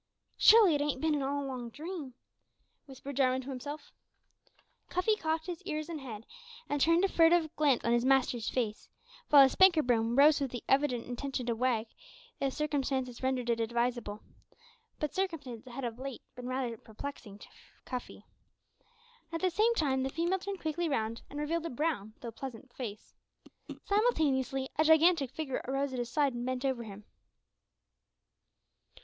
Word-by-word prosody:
"Surely 430 -6 +7
it 290 - +1
ain't 290 -2 -1
bin 305 -1 +1
all 280 +1 -1
a - - -5
long 250 -3 -5
dream!" 300 -1 -7 0.7
whispered 275 +1 -8
Jarwin 260 -1 +2
to 265 - -9
himself. 285 +3 -7 1.0
Cuffy 365 +5 +2
cocked 320 -4 -2
his 355 0 -5
ears 310 -4 -4
and 320 -3 -5
head, 225 -4 -8 0.4
and 290 -1 -1
turned 335 +5 +4
a - - +3
furtive 330 -3 +3
glance 285 -5 +2
on 235 - +2
his 240 0 +2
master's 255 -3 +2
face, 220 -4 -3 0.4
while 285 -2 +9
his 265 - +4
"spanker 365 -5 +5
boom" 235 -1 +1
rose 290 +2 +6
with 275 - 0
the 245 -1 -6
evident 270 -4 +2
intention 250 +1 -4
to 235 -1 0
wag, 235 -2 +1 0.5
if 275 -1 0
circumstances 270 -4 -2
rendered 260 -2 -1
it 230 - 0
advisable; 235 -2 -1 0.8
but 300 -2 -2
circumstances 280 - -4
had 265 +3 -6
of 235 0 -5
late 270 -2 -6
been 250 0 -7
rather 255 -3 -2
perplexing 220 -2 -9
to - - -13 0.4
Cuffy. 250 -2 -7 1.1
At 330 - -3
the 370 -1 +2
same 450 +6 +3
time 270 -8 +1
the 265 - -1
female 340 +6 0
turned 395 0 -6
quickly 320 +2 -1
round 230 -4 -2
and 290 - -6
revealed 330 +3 -1
a - - -5
brown, 245 -6 -2
though 235 - -6
pleasant, 255 +1 -9
face. 215 -5 -7 0.7
Simultaneously, 285 - +1
a - - +6
gigantic 320 -2 +5
figure 275 -1 -4
arose 270 +1 -1
at 255 - -3
his 240 -1 -3
side 285 -2 +1
and 240 0 -4
bent 255 +1 -2
over 260 -3 0
him. 205 0 -10
270 Hz, 165 wpm, -31 LUFS, 245-315 Hz, 1.1 s, while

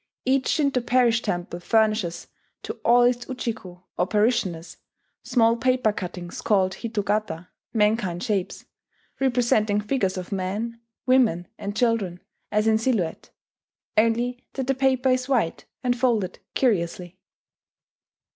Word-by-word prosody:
Each 265 0 +2
Shinto 280 -4 +1
parish 240 -1 +3
temple 175 -4 -3
furnishes 215 -3 +1 0.4
to - - -4
all 240 +1 +5
its 245 0 +1
Ujiko, 220 -8 -5 0.2
or 180 - +2
parishioners, 195 -5 0 0.4
small 230 -3 +3
paper 255 -3 +2
cuttings 180 -2 -6
called 190 -3 +2
hitogata 210 -6 -2 0.2
("mankind 210 -5 +1
shapes"), 205 -6 -2 0.5
representing 235 -5 +2
figures 210 -3 -1
of 185 +2 -6
men, 205 +5 -3 0.2
women, 235 -10 +3
and 200 +1 -4
children 220 -7 +1 0.3
as 210 +1 +2
in 220 0 +3
silhouette, 220 -9 -1 0.7
only 235 +3 +1
that 265 - -3
the 270 - +2
paper 265 -1 +2
is 255 +1 +1
white, 230 -11 0 0.2
and 245 -1 +2
folded 225 -8 +1 0.2
curiously. 180 -6 0
220 Hz, 120 wpm, -24 LUFS, 185-245 Hz, 0.7 s, all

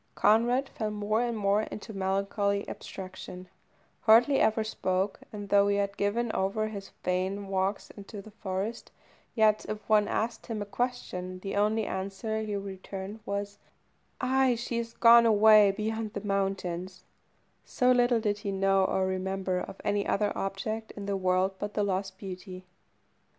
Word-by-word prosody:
Conrad 240 +5 +3
fell 215 -2 -3
more 210 +1 0
and 240 -2 -1
more 200 0 +2
into 215 0 -7
melancholy 200 +1 0
abstraction, 185 -1 -8 0.5
hardly 235 +5 +5
ever 220 0 +3
spoke, 190 -2 -1
and 205 -2 -7
though 200 0 +5
he 200 - +2
had 200 0 -1
given 220 +4 0
over 215 +3 0
his 200 -2 -7
vain 190 +2 -1
walks 195 +1 -1
into 205 0 -10
the 210 +2 -11
forest, 205 +2 -4 0.5
yet 215 -2 +4
if 215 -1 -5
one 210 -1 +4
asked 230 +1 -2
him 225 -2 -3
a 205 - -3
question, 200 -6 -3
the 195 +1 -4
only 215 +2 +2
answer 200 +4 -3
he 215 -1 -3
returned 195 +1 -6
was 200 0 -3 0.6
"Ay, 260 -1 +3
she 235 0 -3
is 230 0 -5
gone 235 0 +7
away 215 -1 +7
beyond 215 +1 -3
the - - -4
mountains," 190 -2 -2 0.6
so 250 -1 +2
little 245 -1 +4
did 210 -2 -1
he 205 -2 -3
know 195 0 +2
or 190 0 +1
remember 190 0 -1
of 190 - -7
any 205 0 0
other 205 0 +1
object 215 +3 -3
in 200 - -5
the 200 0 -1
world 185 0 +2
but 205 0 -5
the 210 - +1
lost 190 -1 -2
beauty. 185 -1 -8
205 Hz, 160 wpm, -29 LUFS, 195-220 Hz, 0.6 s, gone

